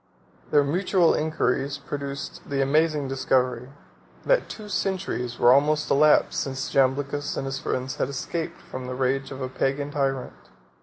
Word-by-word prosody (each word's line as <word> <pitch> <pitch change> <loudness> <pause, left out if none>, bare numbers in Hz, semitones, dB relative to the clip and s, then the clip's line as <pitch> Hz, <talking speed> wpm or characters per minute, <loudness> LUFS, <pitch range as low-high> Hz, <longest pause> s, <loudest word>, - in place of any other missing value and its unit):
Their 145 - +4
mutual 180 +3 +2
inquiries 140 -2 0
produced 140 -1 -6
the 140 -1 -1
amazing 150 +1 +2
discovery, 130 -2 0 0.6
that - - +2
two 215 -1 -8
centuries 185 - -2
were 120 - +6
almost 150 +2 +2
elapsed 150 +2 +4
since 135 +1 -4
Jamblichus 140 +2 +1
and - - -2
his 135 0 -3
friends 130 +2 -3
had - - -1
escaped 160 +4 -4
from 130 -1 -7
the 125 - -4
rage 135 +1 0
of 135 -1 -6
a - - -1
Pagan 140 +2 -1
tyrant. 135 -3 -1
140 Hz, 150 wpm, -25 LUFS, 130-150 Hz, 0.6 s, were